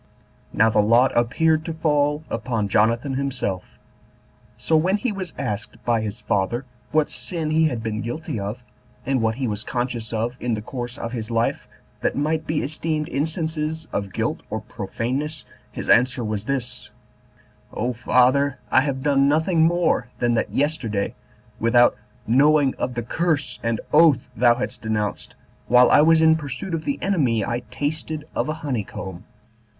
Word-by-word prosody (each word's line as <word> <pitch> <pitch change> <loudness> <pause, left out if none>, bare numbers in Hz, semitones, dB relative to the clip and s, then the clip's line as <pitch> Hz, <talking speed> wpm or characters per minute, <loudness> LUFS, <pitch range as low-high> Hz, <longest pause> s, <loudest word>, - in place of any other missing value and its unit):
Now 110 +1 +3
the 105 - +4
lot 115 +5 +4
appeared 155 +7 +2
to 165 - -4
fall 150 -1 +1
upon 115 -3 -1
Jonathan 115 +6 +2
himself. 130 -9 -3 0.8
So 160 - +1
when 180 +6 +3
he 235 +3 -1
was 190 -4 -5
asked 105 -5 -4
by 115 -2 +2
his 105 -2 -5
father 105 +6 -1 0.3
what 155 -1 +3
sin 165 -4 -3
he 160 +1 +4
had 120 -6 -3
been 110 -1 -2
guilty 120 0 -4
of, 105 +5 -5 0.4
and 135 -2 +1
what 110 0 +1
he 130 0 -2
was 105 -1 -3
conscious 120 -3 -3
of 115 +2 -2
in 120 -2 -1
the 105 - -5
course 120 +1 -5
of 115 - -5
his 110 -2 -4
life 115 0 0 0.3
that - - -1
might 155 +2 -1
be 155 -1 0
esteemed 155 +1 -2
instances 160 +1 -2
of 100 -1 -2
guilt - - -2
or - - -3
profaneness, 140 +6 -4 0.3
his - - -6
answer 125 0 +4
was 105 -1 -3
this, 125 -2 -3 0.8
"O 125 +3 -2
father, 130 +4 +3
I 130 - +6
have 135 -2 -2
done 140 -1 +3
nothing 160 +3 +2
more 165 -6 +2
than 120 -1 +1
that 115 - 0
yesterday, 130 -9 -1 0.5
without 120 +2 +4 0.3
knowing 140 +3 +4
of 125 - -2
the 120 - -2
curse 145 -1 -1
and 115 -2 -1
oath 150 -5 +5
thou 120 +1 +5
hadst 125 - -4
denounced, 105 -2 -3 0.3
while 125 +1 +6
I - - +7
was 160 +1 +5
in 160 0 +6
pursuit 145 +4 -5
of 160 -1 -2
the 280 - -1
enemy, 130 - +1
I 120 0 -1
tasted 150 +2 -3
of - - -1
a - - 0
honey 125 -7 -1
comb." 95 -1 -8
130 Hz, 165 wpm, -23 LUFS, 115-155 Hz, 0.8 s, I